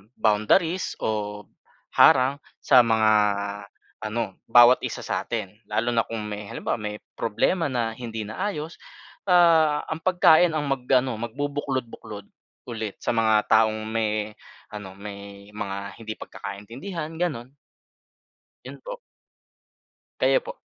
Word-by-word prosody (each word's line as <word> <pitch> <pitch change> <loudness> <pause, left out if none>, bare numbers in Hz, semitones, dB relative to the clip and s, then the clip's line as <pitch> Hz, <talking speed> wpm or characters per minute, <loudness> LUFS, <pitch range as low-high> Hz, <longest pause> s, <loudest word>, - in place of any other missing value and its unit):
boundaries 135 - +2
o 105 -1 -2 0.6
harang 130 +2 +6 0.2
sa 125 -3 +6
mga 110 -1 +3 0.9
ano, 110 -2 -3 0.2
bawat 120 +1 +7
isa - - -4
sa - - -2
atin. 95 +2 -4
Lalo 115 +3 -1
na 115 - +3
kung 115 -2 -5
may 105 0 -5
halimbawa - - -2
may 105 -1 -5 0.2
problema 140 - 0
na 115 -2 -1
hindi 115 -3 -5
naayos, 160 - -4 0.5
ah, 165 -5 +5
ang 160 0 -4
pagkain 175 -2 +5
ang 150 -1 -1
mag 135 -2 -1
ano 130 -1 +3
magbubuklod-buklod 130 -4 -4 0.4
ulit 110 -3 -5
sa - - 0
mga 110 -1 +3
taong 110 -1 +3
may 110 -1 -1 0.4
ano, 105 -2 -7
may 100 0 -10
mga 100 -2 -4 0.2
hindi 110 -1 -5
pagkakaintindihan, 135 - -7
ganun. 140 -8 -3 1.1
Yun - - -9
po. - - -7 1.2
Kayo - - +4
po? - - -6
115 Hz, 120 wpm, -25 LUFS, 105-145 Hz, 1.2 s, bawat